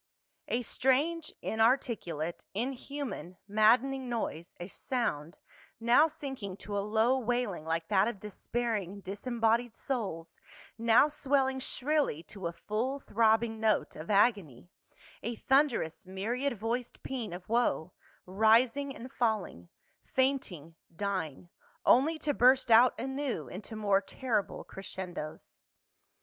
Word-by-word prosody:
A 245 +1 0
STRANGE, 300 +8 +1
inarticulate, 220 - 0
inhuman, 255 -5 -4
maddcninj^ 230 +6 +4
noise, 225 - -4
a 175 - -6
sound, 195 - -3 0.4
now 240 +7 +5
sinking 270 - -6
to 205 0 -6
a 200 - +1
low 225 +5 +2
wailini^ 230 -9 -1
like 165 0 -1
that 200 0 +4
of 235 -4 -4
despairing 210 -1 -3
disembodied 230 +3 0
souls, 200 -11 -4 0.4
now 230 +4 +5
swelling 270 -2 +1
shrilly 270 - 0
to 190 -2 -6
a - - -3
full 230 +10 -2
throbbing 225 -1 +2
note 220 -1 +1
of 155 - -8
agony, 195 - +2 0.5
a 235 +2 -3
thunderous 235 - +1
myriad 235 +7 -2
voiced 235 +3 -3
pean 245 -7 -4
of 175 +1 -8
woe, 225 -7 +1 0.3
rising 230 +8 +3
and 255 -2 -9
falling, 215 - -1 0.3
fainting, 260 - -1 0.2
dying, 180 -4 -3 0.3
only 300 +6 +5
to 300 -1 -1
burst 255 -1 +4
out 240 +3 +6
anew 265 - -3
into 205 - -8
more 200 -2 +2
terrible 220 -1 -2
cres 195 - -8
cendos. 175 -5 -7
225 Hz, 120 wpm, -31 LUFS, 195-260 Hz, 0.5 s, out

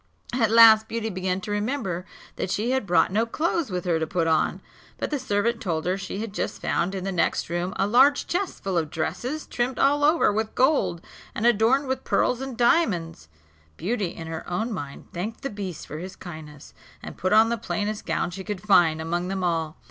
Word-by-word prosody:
At 230 -3 +2
last 220 -1 +8
Beauty 225 -1 -3
began 185 0 -2
to 210 - -6
remember 205 -5 -2 0.3
that - - -3
she 220 +6 0
had 260 -6 0
brought 175 0 +3
no 220 +4 +1
clothes 325 +3 -1
with 180 -1 -3
her 170 -2 +1
to 160 - -2
put 170 0 0
on; 160 -1 +1 0.4
but - - -3
the 295 - 0
servant 230 -1 0
told 165 -5 -2
her 180 +1 +1
she 195 0 -6
had 220 -3 -5
just - - -3
found 190 +3 -1
in 190 - -4
the 195 - -2
next 175 -3 0
room 175 +2 -2
a 195 - +1
large 260 +7 +4
chest 375 +2 -3
full 190 -3 +1
of 155 -2 -3
dresses, 215 - -3
trimmed 245 +2 -2
all 290 +1 +3
over 305 -7 +4
with 220 +1 -2
gold, 260 - +2 0.3
and 225 - -2
adorned 240 +5 +4
with 260 0 -2
pearls 250 0 +1
and 265 -3 -6
diamonds. 180 - +1 0.5
Beauty 205 +2 -1
in 165 - -7
her 160 0 -5
own 220 +6 -2
mind 145 -7 -7
thanked 205 +6 -5
the 275 - -3
beast 195 -5 -6
for 150 - -7
his 185 +2 -7
kindness, 155 -4 -10 0.3
and - - -8
put 185 - -2
on 220 +2 +6
the 235 - +1
plainest 210 -1 -3
gown - - -1
she 190 +2 -7
could 205 -1 -4
find 175 -6 +4
among 175 +2 -2
them 190 0 -3
all. 165 -3 -1
200 Hz, 210 wpm, -25 LUFS, 175-235 Hz, 0.5 s, last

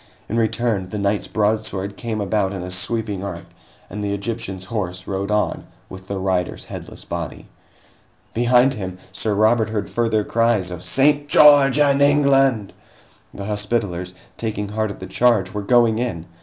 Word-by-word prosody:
In 110 - -3
return, 115 -4 0
the 105 - -4
knight's 100 0 0
broadsword 105 -2 -1
came 110 -1 -4
about 100 -1 0
in 95 -2 -5
a 90 - -6
sweeping 100 +1 -2
arc, 100 - -6 0.4
and 105 - -6
the 100 0 -1
Egyptian's 100 -2 -5
horse 90 -5 -4
rode 100 +1 -3
on 105 0 0 0.2
with 95 0 -10
the 100 - -3
rider's 95 -2 -2
headless - - -9
body. 85 -4 -6 0.9
Behind 125 +3 +4
him, 95 -5 -6
Sir 105 +2 -1
Robert 110 +2 +3
heard 110 -2 -3
further 115 -2 +1
cries 115 -5 +1
of 90 -1 -6
"St. 145 +6 +2
George 145 -2 +7
and 140 -1 +3
England!" 135 -7 +3 0.6
The 100 - -7
Hospitallers, 105 -4 -2 0.2
taking 105 -3 -3
heart 110 +1 -1
at 100 - -8
the - - -7
charge, 110 -6 +2
were 105 - -3
going 115 +1 +3
in! 110 -10 -3
105 Hz, 160 wpm, -21 LUFS, 95-120 Hz, 0.9 s, George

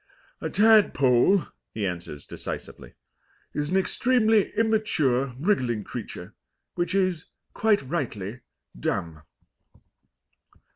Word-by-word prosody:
"A - - -2
tadpole," 195 - +4 0.3
he 105 -2 -1
answers 85 -5 -5
decisively, - - -7 0.6
"is 150 0 -2
an 185 - +2
extremely 220 +1 +2
immature 155 - +1
wriggling 130 - 0
creature, - - -8 0.4
which 175 +2 -1
is, 185 -4 +1 0.3
quite 215 -7 +2
rightly, 125 - -4 0.4
dumb." 80 +6 -3
155 Hz, 90 wpm, -26 LUFS, -, 0.6 s, tadpole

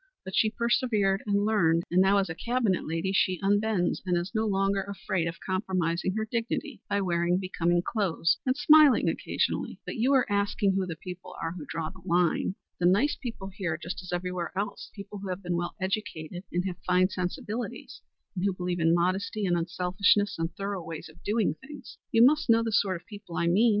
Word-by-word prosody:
But 190 - -5
she 220 - +4
persevered 220 -4 +1
and 200 0 +2
learned, 170 -6 +3
and 180 +2 +4
now 195 +1 +4
as 195 -1 +2
a 165 - -4
Cabinet 235 0 0
lady 165 +4 -1
she 185 -2 +2
unbends, 205 -2 +1
and 180 -2 +1
is 175 +4 -3
no 220 0 +1
longer 195 0 +1
afraid 190 -3 -2
of 170 +1 -4
compromising 185 -1 -1
her 220 0 -1
dignity 230 +1 -3
by 200 - +1
wearing 175 -1 +1
becoming 175 -2 0
clothes 175 -7 +1
and 255 +1 0
smiling 305 -2 +6
occasionally. - - -1
But - - -5
you 240 +4 +2
were 270 -2 +4
asking 200 -1 +1
who 190 -1 0
the 165 - -4
people 180 +2 -9
are 165 - -2
who 165 -4 -8
draw 160 -1 -3
the 190 -1 -15
line. 175 +1 +1 0.2
The 175 - +3
nice 210 +11 +3
people 225 -6 -6
here 185 -5 -3
just 170 +3 -6
as 180 - -9
everywhere 180 0 -3
else; 200 +1 -3
the 200 - -8
people 200 +1 -9
who 195 -1 -6
have 185 +2 -4
been 175 -1 -1
well 175 0 -3
educated 190 -3 -4
and 180 +1 -1
have 180 -2 -4
fine 185 0 +2
sensibilities, 200 +6 -5 0.3
and 180 - -2
who 200 -1 +2
believe 180 -1 -2
in 165 +1 +4
modesty, 190 +4 0
and 175 -2 +2
unselfishness 180 +4 +1
and 165 +1 -1
thorough 195 -2 -4
ways 165 -1 -7
of 165 +2 -18
doing 215 +1 +1
things. 290 +2 -12
You 230 +1 +7
must 300 0 +3
know 230 0 +5
the 225 - -2
sort 195 -4 +1
of 170 - -28
people 200 -5 -10
I - - +1
mean. 200 +8 +4
190 Hz, 205 wpm, -28 LUFS, 175-205 Hz, 0.3 s, You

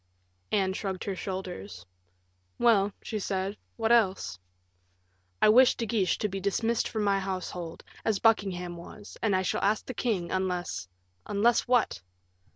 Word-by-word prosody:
Anne 190 -2 +2
shrugged 190 -2 -3
her 195 - -3
shoulders. 175 - -6 0.7
"Well," 210 -4 +4
she 215 - -3
said, 195 0 -2 0.2
"what 225 0 +1
else?" 195 - +2 1.0
"I - - +7
wish 250 +4 +7
De 230 - -2
Guiche 210 -4 +1
to 210 - 0
be 195 -1 -4
dismissed 225 +4 0
from 215 -2 -2
my 200 -1 +2
household, 185 -3 -5 0.2
as 220 -3 +1
Buckingham 190 -6 +1
was, 205 +4 -11
and 210 -4 +2
I 185 - +1
shall - - -1
ask 205 +2 +1
the 255 - -5
king, 210 -8 -1
unless 180 - -2 0.2
" 90 0 -43
"Unless 220 +4 +2
what?" 245 - +2
195 Hz, 155 wpm, -29 LUFS, 185-220 Hz, 1.0 s, I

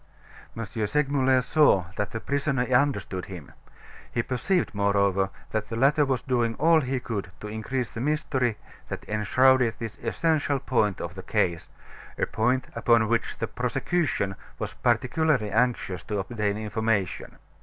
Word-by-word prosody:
M. 115 - -3
Segmuller 130 +4 +1
saw 140 - +4
that 105 - -2
the 115 - -5
prisoner 140 0 0
understood 125 -8 +1
him. 85 -7 -9 0.6
He 120 - 0
perceived, 130 - 0
moreover, 100 -1 +2 0.2
that 110 -1 -2
the 115 - -3
latter 140 +5 +4
was 130 -3 -1
doing 120 -3 0
all 160 +2 +4
he 130 -1 -1
could 105 -5 -4
to 105 - -7
increase 110 +4 -3
the 115 - -5
mystery 130 -5 0 0.3
that - - -6
enshrouded 125 +3 +3
this 115 -2 -6
essential 155 -4 0
point 110 -7 0
of 85 - -5
the 95 - -7
case 90 -4 -1 0.5
a - - +1
point 125 +4 0
upon 115 -2 +3
which 115 0 0
the - - -1
prosecution 155 - -1 0.2
was - - -4
particularly 125 0 +1
anxious 115 -5 0
to 105 - -2
obtain 105 0 -1
information. 110 -3 -2
115 Hz, 145 wpm, -26 LUFS, 105-135 Hz, 0.6 s, saw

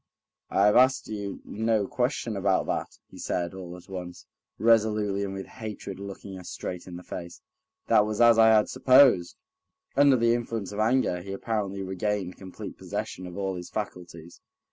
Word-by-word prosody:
"I 100 - +3
have 105 - +5
asked 130 +1 +4
you 100 -2 -5
no 110 -1 0
question 120 0 -1
about 95 -1 +1
that," - - -3
he - - -12
said, 85 -1 -2
all 90 -2 -8
at 90 - -16
once, 90 -2 -8 0.3
resolutely 105 -2 +2
and 95 -1 -4
with 95 - -5
hatred 105 -3 -7
looking 100 -1 -8
her 90 - -10
straight 90 +1 -6
in 90 - -8
the 90 - -9
face; 85 -1 -8 0.5
"that 105 - +4
was 105 -1 -3
as 120 -1 +6
I 110 - +7
had 110 -1 +5
supposed." 130 -9 +5 0.6
Under 140 0 +6
the 115 -1 +3
influence 115 -4 -3
of 105 - -6
anger 110 -5 +2
he 95 +2 -7
apparently 100 -2 -3
regained 95 0 -2
complete 95 -1 -9
possession 90 0 -5
of 90 - -9
all 95 -1 -1
his 90 -1 -7
faculties. 85 -5 -7
100 Hz, 175 wpm, -27 LUFS, 95-110 Hz, 0.6 s, I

